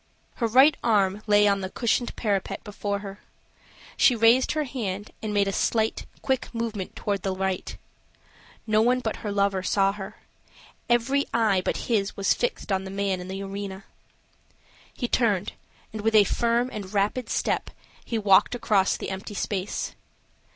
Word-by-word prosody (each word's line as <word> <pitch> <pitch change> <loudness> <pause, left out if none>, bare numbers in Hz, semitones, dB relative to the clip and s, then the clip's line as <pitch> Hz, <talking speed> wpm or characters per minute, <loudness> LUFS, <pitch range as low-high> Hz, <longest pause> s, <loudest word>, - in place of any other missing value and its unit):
Her 235 - +1
right 265 +6 +6
arm 205 -3 +2
lay 210 0 +5
on 200 -1 +2
the 190 - -4
cushioned 235 +3 -1
parapet 200 -4 -2
before 205 -1 -3
her. 195 +1 -8 0.8
She 250 - +5
raised 230 +3 +4
her 305 0 0
hand, 215 -7 -4
and 215 - -3
made 200 -1 +2
a - - 0
slight, 220 +3 0 0.2
quick 265 -2 -1
movement 225 -5 -4
toward 200 -2 -2
the 190 0 -2
right. 190 -1 -3 0.9
No 215 -1 +3
one 250 +2 +3
but 220 -3 -3
her 210 - -4
lover 200 -1 +1
saw 195 +1 +2
her. 195 -1 -8 0.7
Every 245 +4 +2
eye 215 -5 +3
but - - -2
his 205 -4 0
was 200 - +3
fixed 240 -3 -3
on 190 0 +1
the 190 - -7
man 195 -1 -1
in 180 - -8
the 195 +1 -5
arena. 195 0 -6 1.1
He 245 - -3
turned, 210 -6 +1 0.4
and 215 - -4
with 220 +1 +1
a 210 - +8
firm 235 +4 0
and 200 -3 -6
rapid 210 +4 0
step - - -1 0.3
he 230 - -3
walked 205 +2 +4
across 200 -5 +2
the - - -5
empty 190 +2 -6
space. 195 -1 -3
205 Hz, 165 wpm, -25 LUFS, 195-230 Hz, 1.1 s, a